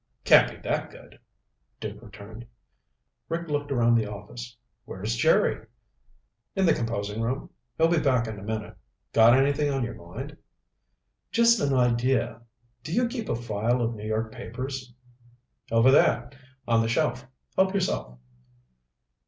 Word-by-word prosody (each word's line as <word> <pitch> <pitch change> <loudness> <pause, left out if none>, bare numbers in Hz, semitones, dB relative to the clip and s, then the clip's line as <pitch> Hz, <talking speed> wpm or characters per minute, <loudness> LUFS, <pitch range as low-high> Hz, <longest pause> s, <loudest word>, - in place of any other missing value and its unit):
"Can't - - +6
be - - -11
that - - -1
good," - - -16 0.6
Duke - - -7
returned. 105 +3 -11 0.8
Rick 170 0 -3
looked 145 -1 -2
around 120 -3 +3
the 115 -2 +2
office. 115 +4 -9 0.3
"Where's 105 +5 -4
Jerry?" 115 - +2 0.9
"In 195 -1 +2
the 165 - +5
composing 110 -2 -3
room. 125 +4 -3 0.3
He'll 165 - +4
be 170 -1 +2
back 130 -6 +2
in 110 -3 -6
a - - -11
minute. 110 +1 -5 0.4
Got 115 +3 +7
anything 145 +2 +2
on 135 -2 -1
your 120 0 -4
mind?" 85 0 -9 0.9
"Just 235 -1 +4
an 140 -1 +1
idea. 125 -1 +1 0.4
Do 155 - -7
you 240 +7 +2
keep 235 -2 -5
a - - +1
file 115 +1 -1
of 120 -1 0
New 105 -1 -7
York 110 +1 -2
papers?" 130 +3 -6 0.8
"Over 115 +3 +5
there. 120 -2 +3 0.4
On 115 -1 +3
the 115 - -1
shelf. 125 -1 0 0.3
Help 190 +1 +2
yourself." 60 - -2
120 Hz, 145 wpm, -26 LUFS, 110-140 Hz, 0.9 s, Got